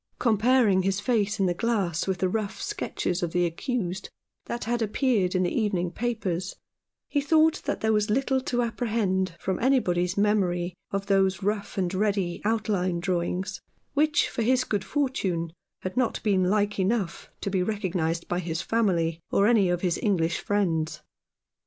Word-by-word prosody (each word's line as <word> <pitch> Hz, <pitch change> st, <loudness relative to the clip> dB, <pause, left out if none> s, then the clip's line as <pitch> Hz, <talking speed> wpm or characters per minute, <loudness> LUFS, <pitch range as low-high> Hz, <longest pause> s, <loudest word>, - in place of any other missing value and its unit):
Comparing 225 Hz, -3 st, +3 dB
his 190 Hz, +1 st, 0 dB
face 210 Hz, -2 st, 0 dB
in 195 Hz, -, +3 dB
the 180 Hz, -, +2 dB
glass 195 Hz, -5 st, 0 dB
with 190 Hz, -1 st, 0 dB
the 185 Hz, -, +1 dB
rough 205 Hz, +1 st, -2 dB
sketches 395 Hz, -, -2 dB
of 170 Hz, -2 st, -2 dB
the 175 Hz, 0 st, +2 dB
accused 190 Hz, +1 st, -3 dB, 0.4 s
that 235 Hz, -, -4 dB
had 240 Hz, +1 st, -1 dB
appeared 215 Hz, -4 st, +1 dB
in 185 Hz, -, +2 dB
the 175 Hz, -, 0 dB
evening 190 Hz, -6 st, 0 dB
papers, 190 Hz, -5 st, -2 dB, 0.5 s
he 290 Hz, -, 0 dB
thought 315 Hz, +2 st, +3 dB
that -, -, -2 dB
there 220 Hz, 0 st, +2 dB
was 210 Hz, 0 st, +1 dB
little 265 Hz, +3 st, +1 dB
to 245 Hz, -1 st, 0 dB
apprehend 210 Hz, -6 st, -1 dB
from 190 Hz, -, -2 dB
anybody's 180 Hz, -9 st, +2 dB
memory 185 Hz, -4 st, +1 dB, 0.2 s
of 195 Hz, 0 st, -2 dB
those 195 Hz, -1 st, +2 dB
rough 205 Hz, 0 st, -2 dB
and 185 Hz, -1 st, 0 dB
ready 195 Hz, -3 st, 0 dB
outline 205 Hz, -5 st, 0 dB
draw 180 Hz, -1 st, 0 dB
ings, 185 Hz, +2 st, -3 dB, 0.3 s
which, 300 Hz, +1 st, +3 dB
for -, -, -3 dB
his 255 Hz, +3 st, +3 dB
good 205 Hz, -6 st, -2 dB
fortune, 190 Hz, -, -1 dB, 0.3 s
had 185 Hz, -, -4 dB
not 255 Hz, -2 st, +1 dB
been 190 Hz, -4 st, +2 dB
like 205 Hz, 0 st, +1 dB
enough 190 Hz, -2 st, -1 dB
to 200 Hz, -, -3 dB
be 190 Hz, -1 st, +1 dB
recognized 180 Hz, -5 st, -1 dB
by 175 Hz, -, -1 dB
his 165 Hz, -2 st, -3 dB
family, 170 Hz, -8 st, +1 dB
or 200 Hz, -, +3 dB
any 210 Hz, -5 st, +4 dB
of 175 Hz, 0 st, 0 dB
his 175 Hz, -3 st, 0 dB
English 170 Hz, -6 st, +1 dB
friends. 165 Hz, -6 st, 0 dB
195 Hz, 170 wpm, -26 LUFS, 180-225 Hz, 0.5 s, any